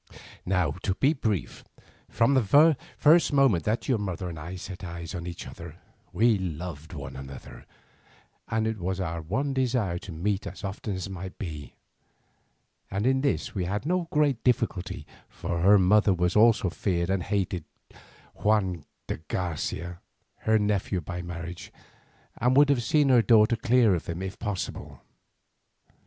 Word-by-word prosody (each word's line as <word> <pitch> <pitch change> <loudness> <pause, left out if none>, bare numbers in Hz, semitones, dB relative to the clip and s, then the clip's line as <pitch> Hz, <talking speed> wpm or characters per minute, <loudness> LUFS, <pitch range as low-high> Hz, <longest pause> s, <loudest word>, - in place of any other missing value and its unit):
"Now 90 -5 +2
to 95 -2 -1
be 140 +8 +3
brief, 110 - -3 0.5
from 115 +4 +2
the 140 +6 +5 0.2
first 160 +3 +5
moment 135 - +3
that 110 +2 -1
your 125 -5 +2
mother 95 -2 -3
and 80 -2 -7
I 85 +4 -7
set 95 0 -8
eyes 85 0 -6
on 85 -2 -5
each 85 -1 -7
other - - -10 0.4
we 110 +3 +3
loved 80 -3 -6
one 70 -3 -7
another, 65 0 -10 0.8
and 110 -1 0
it 110 -1 -2
was 95 +1 -2
our 85 -3 -3
one 130 - -2
desire 120 -9 0
to 95 - -9
meet 95 +5 -2
as 95 - -9
often 100 +1 -4
as 95 +1 -4
might 95 -1 -7
be; 75 -8 -7 1.1
and 100 +3 -2
in 130 +1 +3
this 140 -1 -1
we 95 -4 -2
had 105 +7 -3
no 175 +1 0
great 145 -5 +2
difficulty, 95 - 0 0.2
for 85 - -4
her 100 +3 +7
mother 100 +2 +4
also 95 +2 +3
feared 90 -1 -1
and 95 -1 +1
hated 95 -3 -1 0.7
Juan 95 -7 0 0.2
de - - -3
Garcia, 85 0 -3 0.4
her 110 0 +2
nephew 105 -2 0
by 85 +2 -5
marriage, 85 0 -7 0.7
and 125 +2 +3
would 145 0 +6
have 140 -4 +3
seen 145 +5 +2
her 125 -3 +6
daughter 110 +2 +5
clear 115 -2 +3
of 85 -4 -3
him 85 +2 -4
if 95 0 -6
possible. 105 -4 -5
95 Hz, 155 wpm, -27 LUFS, 90-115 Hz, 1.1 s, her